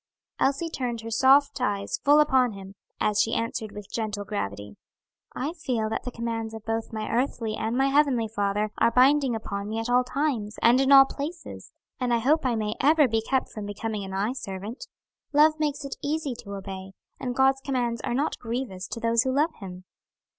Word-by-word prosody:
Elsie 275 Hz, +5 st, +1 dB
turned 245 Hz, -5 st, -3 dB
her 225 Hz, 0 st, -7 dB
soft 270 Hz, +3 st, +4 dB
eyes 200 Hz, -4 st, -1 dB
full 290 Hz, +1 st, +6 dB
upon 260 Hz, -6 st, +3 dB
him, 195 Hz, 0 st, -10 dB, 0.3 s
as 210 Hz, -1 st, +2 dB
she 225 Hz, +1 st, 0 dB
answered 225 Hz, -2 st, -3 dB
with 205 Hz, -2 st, -10 dB
gentle 210 Hz, -3 st, -3 dB
gravity: 100 Hz, -, -5 dB, 0.6 s
"I 290 Hz, +5 st, -2 dB
feel 250 Hz, -10 st, -2 dB
that -, -, -3 dB
the 250 Hz, -, -4 dB
commands 230 Hz, -1 st, -4 dB
of 220 Hz, -, -10 dB
both 225 Hz, 0 st, -2 dB
my 215 Hz, -1 st, -4 dB
earthly 230 Hz, -3 st, -1 dB
and 225 Hz, +3 st, -2 dB
my 270 Hz, +1 st, +3 dB
heavenly 275 Hz, -5 st, +3 dB
Father 210 Hz, 0 st, -1 dB
are -, -, +5 dB
binding 260 Hz, +1 st, +4 dB
upon 200 Hz, -2 st, -4 dB
me 220 Hz, -, -3 dB
at 225 Hz, +2 st, -2 dB
all 250 Hz, +1 st, +4 dB
times, 250 Hz, -6 st, -2 dB
and 245 Hz, +3 st, +6 dB
in 270 Hz, +1 st, +2 dB
all 270 Hz, -1 st, +10 dB
places, 300 Hz, +5 st, -7 dB, 0.3 s
and 250 Hz, -2 st, -1 dB
I 235 Hz, -, +4 dB
hope 275 Hz, +5 st, +2 dB
I 240 Hz, -, +1 dB
may 215 Hz, -1 st, -1 dB
ever 300 Hz, +1 st, +5 dB
be 225 Hz, -1 st, 0 dB
kept 265 Hz, +3 st, -1 dB
from 210 Hz, -2 st, -7 dB
becoming 210 Hz, 0 st, -4 dB
an 190 Hz, -, -7 dB
eye 205 Hz, +5 st, 0 dB
servant. 210 Hz, -, -7 dB, 0.5 s
Love 310 Hz, +1 st, +5 dB
makes 295 Hz, -1 st, -1 dB
it 275 Hz, -, -6 dB
easy 295 Hz, -2 st, -2 dB
to 200 Hz, -4 st, -7 dB
obey, 190 Hz, 0 st, -7 dB, 0.3 s
and 250 Hz, -1 st, -3 dB
God's 270 Hz, 0 st, +3 dB
commands 245 Hz, -4 st, -1 dB
are 240 Hz, -, -2 dB
not 285 Hz, +4 st, -1 dB
grievous 230 Hz, -6 st, -4 dB
to 230 Hz, -, -6 dB
those 230 Hz, 0 st, +2 dB
who 260 Hz, +1 st, 0 dB
love 300 Hz, +5 st, +1 dB
him." 185 Hz, -2 st, -9 dB
235 Hz, 200 wpm, -26 LUFS, 215-270 Hz, 0.6 s, all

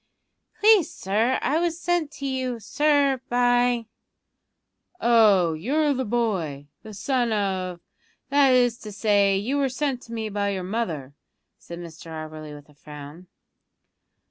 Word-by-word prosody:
"Please, 415 Hz, -6 st, +5 dB
sir, 225 Hz, -, 0 dB
I 305 Hz, +3 st, +1 dB
was 340 Hz, -1 st, -1 dB
sent 350 Hz, -3 st, 0 dB
to 280 Hz, -, -7 dB
you, 260 Hz, -3 st, -2 dB
sir, 280 Hz, +3 st, +2 dB
by 245 Hz, -1 st, +2 dB, 0.6 s
" 360 Hz, -, -44 dB
"Oh, 210 Hz, -8 st, +4 dB
you're 285 Hz, -, +1 dB
the 260 Hz, -1 st, -2 dB
boy, 185 Hz, -12 st, -2 dB
the 220 Hz, -, -11 dB
son 245 Hz, +2 st, 0 dB
of 190 Hz, -4 st, -2 dB, 0.5 s
that 280 Hz, -1 st, +4 dB
is 245 Hz, -2 st, +3 dB
to 210 Hz, -, -9 dB
say, 200 Hz, -2 st, +2 dB
you 240 Hz, +8 st, -1 dB
were 275 Hz, -1 st, +1 dB
sent 260 Hz, -1 st, -2 dB
to 230 Hz, -, -14 dB
me 225 Hz, -1 st, -3 dB
by 200 Hz, 0 st, -1 dB
your 190 Hz, -2 st, -3 dB
mother," 180 Hz, -, -3 dB, 0.5 s
said 170 Hz, -, -9 dB
Mr 170 Hz, -1 st, -10 dB
Auberly 155 Hz, -1 st, -7 dB
with 145 Hz, -1 st, -14 dB
a 150 Hz, -, -21 dB
frown. 150 Hz, +4 st, -11 dB
225 Hz, 145 wpm, -24 LUFS, 180-265 Hz, 0.6 s, Please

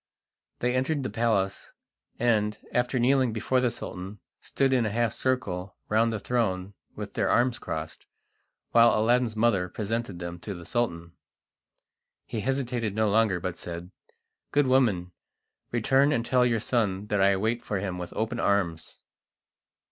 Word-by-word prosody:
They 125 Hz, 0 st, +1 dB
entered 140 Hz, +2 st, 0 dB
the 130 Hz, -, -3 dB
palace, 105 Hz, -4 st, 0 dB, 0.4 s
and, 105 Hz, -3 st, +1 dB, 0.2 s
after 125 Hz, +1 st, +1 dB
kneeling 130 Hz, 0 st, +3 dB
before 125 Hz, +4 st, +1 dB
the 125 Hz, -, +2 dB
Sultan, 95 Hz, -2 st, -6 dB, 0.2 s
stood 135 Hz, -1 st, 0 dB
in 125 Hz, -2 st, +3 dB
a 110 Hz, -, 0 dB
half 115 Hz, +1 st, 0 dB
circle 100 Hz, -8 st, -2 dB
round 115 Hz, +2 st, +3 dB
the 110 Hz, -, -2 dB
throne 100 Hz, -5 st, -1 dB, 0.2 s
with -, -, -6 dB
their -, -, 0 dB
arms 120 Hz, 0 st, +2 dB
crossed, 80 Hz, 0 st, -6 dB, 0.6 s
while 115 Hz, -1 st, +6 dB
Aladdin's 120 Hz, 0 st, +2 dB
mother 105 Hz, -5 st, +2 dB
presented 110 Hz, 0 st, -3 dB
them 85 Hz, 0 st, -6 dB
to 100 Hz, +2 st, -6 dB
the 85 Hz, -1 st, -10 dB
Sultan. 85 Hz, -9 st, -2 dB, 1.1 s
He 115 Hz, -, -4 dB
hesitated 120 Hz, -3 st, -1 dB
no 110 Hz, -1 st, +2 dB
longer, 105 Hz, -3 st, +3 dB
but 90 Hz, 0 st, -4 dB
said: 85 Hz, +1 st, -7 dB, 0.6 s
"Good 145 Hz, -1 st, +3 dB
woman, 115 Hz, -9 st, +2 dB, 0.6 s
return 135 Hz, +5 st, +3 dB
and 115 Hz, -5 st, 0 dB
tell 125 Hz, -1 st, +3 dB
your 115 Hz, -2 st, +1 dB
son 105 Hz, -4 st, 0 dB
that 105 Hz, -2 st, +1 dB
I 100 Hz, 0 st, +4 dB
wait 110 Hz, +4 st, -1 dB
for 105 Hz, -, -2 dB
him 95 Hz, -2 st, -3 dB
with 90 Hz, -1 st, -6 dB
open 115 Hz, +2 st, -2 dB
arms." 90 Hz, -5 st, 0 dB
110 Hz, 155 wpm, -27 LUFS, 95-120 Hz, 1.1 s, while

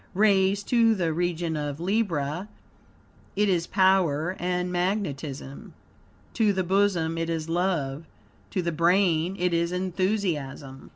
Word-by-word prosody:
Raised 200 Hz, -1 st, +3 dB
to 230 Hz, -2 st, +4 dB
the 170 Hz, -5 st, 0 dB
region 170 Hz, -1 st, -1 dB
of 145 Hz, -1 st, -4 dB
Libra, 175 Hz, -3 st, -1 dB, 0.9 s
it 210 Hz, +1 st, +2 dB
is 175 Hz, -3 st, +1 dB
power 185 Hz, -3 st, +2 dB
and 180 Hz, 0 st, -1 dB
magnetism. 160 Hz, -7 st, -3 dB, 0.6 s
To 220 Hz, -3 st, +3 dB
the 190 Hz, -1 st, 0 dB
bosom 180 Hz, -3 st, +1 dB
it 165 Hz, 0 st, -2 dB
is 165 Hz, -1 st, -2 dB
love; 165 Hz, -4 st, -1 dB, 0.4 s
to 185 Hz, -4 st, -2 dB
the 170 Hz, -, -1 dB
brain 170 Hz, +1 st, +2 dB
it 180 Hz, -1 st, 0 dB
is 170 Hz, 0 st, +1 dB
enthusiasm. 180 Hz, -8 st, -2 dB
175 Hz, 125 wpm, -26 LUFS, 160-190 Hz, 0.9 s, to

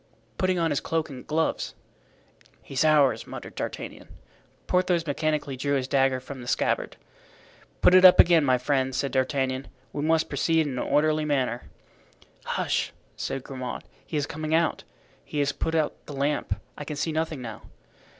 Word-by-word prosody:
"Putting 185 Hz, -1 st, +2 dB
on 165 Hz, -2 st, +1 dB
his 145 Hz, -, +1 dB
cloak 160 Hz, -2 st, -2 dB
and 130 Hz, -2 st, -10 dB
gloves." 160 Hz, +1 st, -1 dB, 0.9 s
"He's 135 Hz, +1 st, -1 dB
ours," 150 Hz, -3 st, +4 dB
muttered -, -, -8 dB
D'Artagnan. -, -, -6 dB, 0.6 s
Porthos 180 Hz, -2 st, +1 dB
mechanically 150 Hz, -2 st, -1 dB
drew 140 Hz, +2 st, 0 dB
his 130 Hz, -2 st, -1 dB
dagger 135 Hz, -1 st, +2 dB
from 130 Hz, 0 st, -9 dB
the 120 Hz, -, -9 dB
scabbard. -, -, 0 dB, 0.8 s
"Put -, -, +6 dB
it 185 Hz, 0 st, +7 dB
up 185 Hz, -1 st, +9 dB
again, 170 Hz, -3 st, +7 dB
my 130 Hz, -2 st, +3 dB
friend," 130 Hz, 0 st, 0 dB
said 140 Hz, +1 st, -1 dB
D'Artagnan. 130 Hz, 0 st, 0 dB, 0.3 s
"We 145 Hz, -, -3 dB
must 160 Hz, +1 st, +2 dB
proceed 165 Hz, -1 st, +1 dB
in 140 Hz, -, -3 dB
an -, -, -2 dB
orderly 155 Hz, +1 st, +3 dB
manner." 130 Hz, -5 st, -1 dB, 0.8 s
"Hush!" -, -, -1 dB, 0.2 s
said 135 Hz, -, -4 dB
Grimaud, 130 Hz, -2 st, -6 dB, 0.2 s
"he 155 Hz, -, -4 dB
is 145 Hz, -, 0 dB
coming 155 Hz, +1 st, -2 dB
out. 165 Hz, 0 st, +1 dB, 0.4 s
He -, -, -7 dB
has 145 Hz, -1 st, +2 dB
put 160 Hz, -, -2 dB
out 155 Hz, -2 st, -1 dB
the 145 Hz, -, -7 dB
lamp, 145 Hz, +2 st, -1 dB, 0.2 s
I -, -, -6 dB
can 150 Hz, +1 st, -5 dB
see 155 Hz, +3 st, -1 dB
nothing 160 Hz, -2 st, -2 dB
now." 115 Hz, -3 st, -7 dB
145 Hz, 170 wpm, -26 LUFS, 135-160 Hz, 0.9 s, up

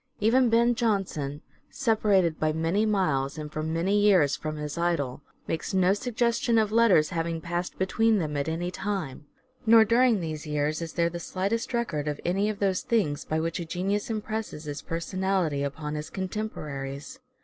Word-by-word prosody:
Even 240 Hz, +4 st, +4 dB
Ben 235 Hz, +1 st, +4 dB
Jonson, 195 Hz, -11 st, -1 dB, 0.3 s
separated 205 Hz, -8 st, +2 dB
by 155 Hz, 0 st, +2 dB
many 165 Hz, +7 st, +1 dB
miles 155 Hz, -9 st, 0 dB
and 150 Hz, -1 st, -6 dB
for 155 Hz, -, -2 dB
many 165 Hz, +6 st, +1 dB
years 185 Hz, -9 st, +4 dB
from 155 Hz, 0 st, -5 dB
his 150 Hz, -1 st, -5 dB
idol, 165 Hz, -6 st, -1 dB, 0.3 s
makes 165 Hz, +4 st, -3 dB
no 185 Hz, 0 st, +4 dB
suggestion 235 Hz, +1 st, 0 dB
of 215 Hz, -2 st, +2 dB
letters 220 Hz, -9 st, +4 dB
having 165 Hz, -1 st, -2 dB
passed 175 Hz, +2 st, -4 dB
between 220 Hz, +4 st, +2 dB
them 155 Hz, -5 st, -2 dB
at 145 Hz, +2 st, -1 dB
any 175 Hz, +2 st, -2 dB
time. 180 Hz, -9 st, -4 dB, 0.4 s
Nor 225 Hz, 0 st, +8 dB
during 235 Hz, 0 st, +4 dB
these 155 Hz, -2 st, -5 dB
years 150 Hz, +1 st, -1 dB
is 165 Hz, -1 st, -5 dB
there 170 Hz, -1 st, +1 dB
the 175 Hz, -, -5 dB
slightest 200 Hz, +8 st, -2 dB
record 190 Hz, -, -1 dB
of 150 Hz, -1 st, -2 dB
any 195 Hz, +4 st, +1 dB
of 215 Hz, -, -3 dB
those 195 Hz, -2 st, +1 dB
things 165 Hz, -11 st, 0 dB
by 155 Hz, -, -1 dB
which 165 Hz, +2 st, -2 dB
a -, -, -3 dB
genius 195 Hz, +6 st, -2 dB
impresses 215 Hz, -6 st, -4 dB
his 145 Hz, -1 st, -5 dB
personality 175 Hz, -3 st, -1 dB
upon 150 Hz, +2 st, -4 dB
his 150 Hz, 0 st, -5 dB
contemporaries. 180 Hz, -, -5 dB
175 Hz, 170 wpm, -27 LUFS, 155-215 Hz, 0.4 s, Nor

